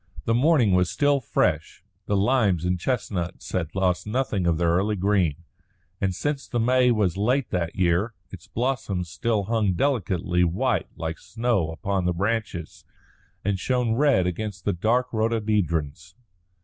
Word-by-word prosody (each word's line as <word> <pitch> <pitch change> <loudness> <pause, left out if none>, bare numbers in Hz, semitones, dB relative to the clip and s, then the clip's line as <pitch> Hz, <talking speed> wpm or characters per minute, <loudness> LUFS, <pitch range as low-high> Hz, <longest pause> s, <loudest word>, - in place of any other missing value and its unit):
The 115 - +2
morning 130 -3 +4
was 90 -1 +3
still 145 -1 +2
fresh. 115 - -1 0.2
The 100 - +1
limes 100 -6 +2
and 90 0 0
chestnuts 95 -6 -3
had 85 -3 -2
lost 90 -1 0
nothing 105 -6 -1
of 85 -2 +2
their 85 0 +2
early 100 +5 +1
green, 90 -5 +1 0.6
and 95 -2 0
since 145 +5 -2
the 120 - -2
May 125 +2 +3
was 105 -7 +1
late 125 +6 +1
that 85 -2 -2
year, 95 +5 +1 0.2
its 95 -3 -11
blossoms 105 -8 -2
still 110 +2 0
hung 105 -2 +1
delicately 90 -6 0
white 85 +3 0
like 80 0 -4
snow 115 -8 -1
upon 90 +4 -2
the 90 - +1
branches 100 -3 -3 0.6
and 100 -1 0
shone 125 0 0
red 135 -7 +3
against 95 +1 -4
the 100 - +1
dark 120 +8 0
rhododendrons. 95 -8 -1
100 Hz, 150 wpm, -25 LUFS, 90-115 Hz, 0.6 s, morning